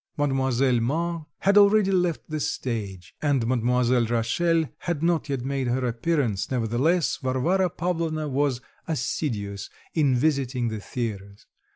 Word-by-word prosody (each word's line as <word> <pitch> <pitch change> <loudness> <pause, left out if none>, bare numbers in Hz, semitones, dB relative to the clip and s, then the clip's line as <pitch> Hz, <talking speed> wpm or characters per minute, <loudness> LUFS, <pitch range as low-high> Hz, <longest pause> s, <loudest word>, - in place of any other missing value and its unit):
Mademoiselle 135 -3 +2
Mars 165 +8 -1 0.2
had 200 +1 +5
already 200 -1 +5
left 180 -3 0
the 155 -1 -3
stage, 100 -10 -4
and 140 -6 +1
Mademoiselle 125 0 +2
Rachel 160 +9 +1
had 170 -3 -3
not 165 -2 +1
yet 135 -3 -2
made 135 -1 -1
her 125 +1 0
appearance; 120 - 0
nevertheless, 130 +7 +1
Varvara 160 +9 +1
Pavlovna 165 -2 -2
was 135 -2 0 0.3
assiduous 110 -8 -3 0.2
in 145 -5 +3
visiting 130 -3 0
the 110 -1 -4
theatres. 100 -3 -5
135 Hz, 130 wpm, -25 LUFS, 120-160 Hz, 0.3 s, had